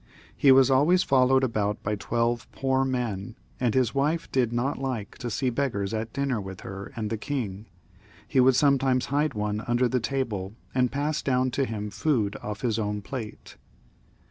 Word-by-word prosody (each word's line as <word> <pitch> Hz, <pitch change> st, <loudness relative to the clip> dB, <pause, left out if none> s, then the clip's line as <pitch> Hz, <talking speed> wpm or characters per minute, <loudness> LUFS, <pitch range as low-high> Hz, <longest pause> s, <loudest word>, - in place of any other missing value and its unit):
He 140 Hz, -, +5 dB
was 135 Hz, 0 st, +6 dB
always 155 Hz, +8 st, +4 dB
followed 130 Hz, 0 st, +4 dB
about 105 Hz, -4 st, -1 dB
by 105 Hz, -, -1 dB
twelve 115 Hz, +3 st, -1 dB
poor 135 Hz, 0 st, +1 dB
men, 120 Hz, -7 st, -2 dB, 0.2 s
and 120 Hz, -3 st, +1 dB
as -, -, +5 dB
his 125 Hz, -3 st, 0 dB
wife 150 Hz, +4 st, 0 dB
did 125 Hz, -4 st, +1 dB
not 120 Hz, +4 st, -1 dB
like 125 Hz, -6 st, -4 dB
to 120 Hz, -, -4 dB
see 125 Hz, +3 st, 0 dB
be^ars 115 Hz, -6 st, -1 dB
at 110 Hz, 0 st, -3 dB
dinner 140 Hz, -5 st, -1 dB
with 95 Hz, -1 st, -8 dB
her 95 Hz, +1 st, -7 dB
and 110 Hz, -2 st, -3 dB
the 110 Hz, -, -2 dB
king, 110 Hz, -7 st, -4 dB, 0.6 s
he 130 Hz, +3 st, +1 dB
would 130 Hz, 0 st, +6 dB
sometimes 135 Hz, -2 st, +3 dB
hide 145 Hz, -2 st, +1 dB
one 105 Hz, 0 st, -1 dB
under 120 Hz, +1 st, +2 dB
the 125 Hz, +1 st, 0 dB
table 110 Hz, -6 st, -3 dB, 0.2 s
and 125 Hz, -1 st, +2 dB
pass 150 Hz, +2 st, -1 dB
down 130 Hz, -1 st, +1 dB
to 135 Hz, +2 st, 0 dB
him 105 Hz, -3 st, -4 dB
food 115 Hz, -10 st, 0 dB
off 105 Hz, -1 st, -5 dB
his 115 Hz, -2 st, 0 dB
o\ni 105 Hz, -1 st, -2 dB
plate. 110 Hz, 0 st, -7 dB
125 Hz, 185 wpm, -26 LUFS, 105-135 Hz, 0.6 s, was